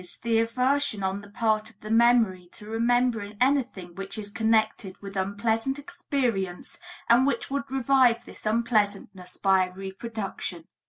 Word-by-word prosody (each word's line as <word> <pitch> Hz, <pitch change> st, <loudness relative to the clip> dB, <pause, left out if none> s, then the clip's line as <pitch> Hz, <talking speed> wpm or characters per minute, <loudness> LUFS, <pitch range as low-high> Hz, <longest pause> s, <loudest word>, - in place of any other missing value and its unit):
the 230 Hz, -1 st, +2 dB
aversion 250 Hz, -1 st, +1 dB
on 190 Hz, +1 st, -1 dB
the 205 Hz, -, -14 dB
part 215 Hz, 0 st, 0 dB
of 200 Hz, -, -23 dB
the 215 Hz, -, -6 dB
memory 225 Hz, -6 st, +3 dB
to 210 Hz, -, -14 dB
remembering 225 Hz, -2 st, 0 dB
anything 250 Hz, -10 st, 0 dB
which 195 Hz, +3 st, -5 dB
is 205 Hz, -1 st, -6 dB
connected 220 Hz, -3 st, 0 dB
with 200 Hz, 0 st, -9 dB
unpleasant 220 Hz, +7 st, -1 dB
experience 265 Hz, -, -3 dB, 0.3 s
and 245 Hz, +3 st, +5 dB
which 280 Hz, -, -2 dB
would 280 Hz, 0 st, -2 dB
revive 260 Hz, -2 st, +3 dB
this -, -, -9 dB
unpleasantness 205 Hz, -5 st, -1 dB
by 190 Hz, -1 st, +3 dB
a -, -, -13 dB
reproduction. 195 Hz, -3 st, -6 dB
220 Hz, 145 wpm, -26 LUFS, 195-245 Hz, 0.3 s, and